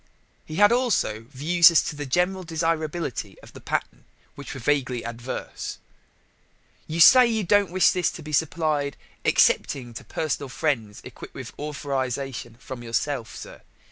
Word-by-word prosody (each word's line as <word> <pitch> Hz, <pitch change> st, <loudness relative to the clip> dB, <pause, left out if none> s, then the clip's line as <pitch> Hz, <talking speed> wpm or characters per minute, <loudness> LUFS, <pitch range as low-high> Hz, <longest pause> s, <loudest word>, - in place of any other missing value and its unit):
He 155 Hz, -, -6 dB
had 205 Hz, +4 st, +6 dB
also 220 Hz, -, +1 dB
views 165 Hz, +5 st, +5 dB
as 170 Hz, -, +4 dB
to -, -, -4 dB
the 145 Hz, -1 st, -5 dB
general 180 Hz, +7 st, +1 dB
desirability 160 Hz, -, -2 dB
of -, -, -15 dB
the -, -, -12 dB
pattern -, -, -3 dB, 0.3 s
which 140 Hz, 0 st, -9 dB
were -, -, -6 dB
vaguely 125 Hz, -2 st, 0 dB
adverse. 120 Hz, +2 st, -6 dB, 1.1 s
"You 160 Hz, +2 st, -4 dB
say 250 Hz, +9 st, +9 dB
you 220 Hz, -2 st, 0 dB
don't 200 Hz, +1 st, +3 dB
wish 185 Hz, +1 st, +4 dB
this 180 Hz, -2 st, +1 dB
to 165 Hz, -, -9 dB
be 150 Hz, 0 st, -8 dB
supplied 150 Hz, -2 st, 0 dB, 0.3 s
excepting 120 Hz, -3 st, +2 dB
to 115 Hz, -, -8 dB
personal 145 Hz, -3 st, -3 dB
friends 125 Hz, -7 st, -2 dB
equipped -, -, -11 dB
with -, -, -7 dB
a -, -, -12 dB
authorization 135 Hz, -4 st, -4 dB
from 130 Hz, -1 st, -8 dB
yourself, 115 Hz, -1 st, -2 dB
sir. -, -, -10 dB
145 Hz, 155 wpm, -24 LUFS, 130-170 Hz, 1.1 s, say